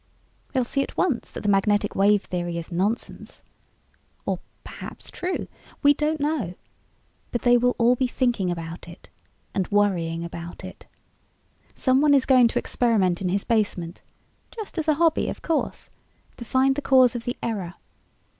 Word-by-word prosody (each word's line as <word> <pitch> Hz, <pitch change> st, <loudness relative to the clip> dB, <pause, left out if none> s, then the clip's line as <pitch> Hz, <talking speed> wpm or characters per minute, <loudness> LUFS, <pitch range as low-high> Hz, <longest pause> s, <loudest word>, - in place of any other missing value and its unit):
They'll 260 Hz, -2 st, +2 dB
see 275 Hz, +3 st, -1 dB
at -, -, -5 dB
once 295 Hz, -10 st, 0 dB
that -, -, -7 dB
the 205 Hz, -, +1 dB
magnetic 205 Hz, +1 st, +2 dB
wave 205 Hz, +1 st, +4 dB
theory 175 Hz, -1 st, -3 dB
is 170 Hz, +2 st, -6 dB
nonsense. 200 Hz, +7 st, -3 dB, 0.8 s
Or -, -, -1 dB, 0.2 s
perhaps -, -, -9 dB
true? 365 Hz, +1 st, -3 dB, 0.4 s
We 285 Hz, 0 st, +7 dB
don't 305 Hz, +2 st, -1 dB
know. 285 Hz, -, -1 dB, 0.8 s
But 240 Hz, -, -2 dB
they 245 Hz, 0 st, +5 dB
will 245 Hz, +1 st, +3 dB
all 240 Hz, +1 st, +4 dB
be 255 Hz, +1 st, 0 dB
thinking 240 Hz, -7 st, 0 dB
about 170 Hz, 0 st, -5 dB
it 170 Hz, +1 st, -13 dB, 0.4 s
and 190 Hz, -2 st, -1 dB
worrying 175 Hz, -5 st, +1 dB
about 170 Hz, 0 st, -8 dB
it. -, -, -11 dB, 0.9 s
Someone 280 Hz, +2 st, +4 dB
is 270 Hz, -, +3 dB
going 255 Hz, -3 st, +6 dB
to -, -, -3 dB
experiment 200 Hz, -8 st, +1 dB
in 185 Hz, -, 0 dB
his 195 Hz, +2 st, 0 dB
basement 200 Hz, -7 st, -1 dB, 0.5 s
just 430 Hz, -6 st, -6 dB
as 320 Hz, -, -2 dB
a 310 Hz, -, +4 dB
hobby 330 Hz, 0 st, +2 dB
of -, -, -7 dB
course 325 Hz, -2 st, -2 dB, 0.5 s
to 235 Hz, -, -8 dB
find 260 Hz, +3 st, +3 dB
the 290 Hz, -, -2 dB
cause 260 Hz, -3 st, +5 dB
of 235 Hz, -1 st, -5 dB
the 245 Hz, -, -3 dB
error. 195 Hz, -6 st, -3 dB
230 Hz, 165 wpm, -24 LUFS, 185-265 Hz, 0.9 s, We